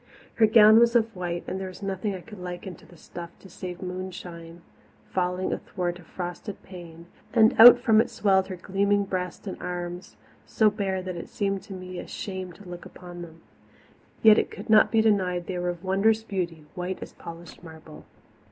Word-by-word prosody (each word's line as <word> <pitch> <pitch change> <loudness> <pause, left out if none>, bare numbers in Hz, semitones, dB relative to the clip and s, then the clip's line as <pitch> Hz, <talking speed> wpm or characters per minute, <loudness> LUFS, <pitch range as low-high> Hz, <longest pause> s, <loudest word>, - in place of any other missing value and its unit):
Her 220 - +4
gown 215 0 +7
was 235 0 +4
of 225 -2 +2
white, 175 -1 -4
and 190 - -4
there 190 - -4
was 185 +2 -10
nothing 195 +1 -2
I 185 - -8
could 210 +1 -12
liken 180 +1 -7
the 175 - -16
stuff 170 +1 -9
to - - -15
save 180 0 -7
moonshine 175 -2 -7 0.5
falling 180 0 -1
athwart 175 -1 -4
a - - -14
frosted 180 +4 -7
pane, 170 -3 -11 0.3
and 225 -1 +5
out 240 +2 +11
from 225 -3 +4
it - - -3
swelled 190 -2 +2
her 190 - -5
gleaming 200 +3 +1
breast 180 -1 -4
and 190 - -6
arms, 175 0 -6 0.3
so 215 -2 +2
bare 190 -2 -2
that 185 -1 -5
it - - -8
seemed 195 -2 -2
to 195 - -9
me 185 -1 -7
a - - -8
shame 185 -2 -6
to 205 +2 -15
look 175 0 -8
upon 175 -1 -11
them. 165 -1 -12 0.8
Yet 220 -1 +8
it - - -1
could 205 +2 -7
not 215 - +6
be 225 -2 +4
denied 185 -5 +1
they 180 -1 -4
were 180 0 -1
of 175 -1 -6
wondrous 210 +4 +2
beauty, 175 -7 -4
white 180 +1 -4
as - - -11
polished 170 0 -11
marble. 160 -2 -12
185 Hz, 195 wpm, -26 LUFS, 175-205 Hz, 0.8 s, out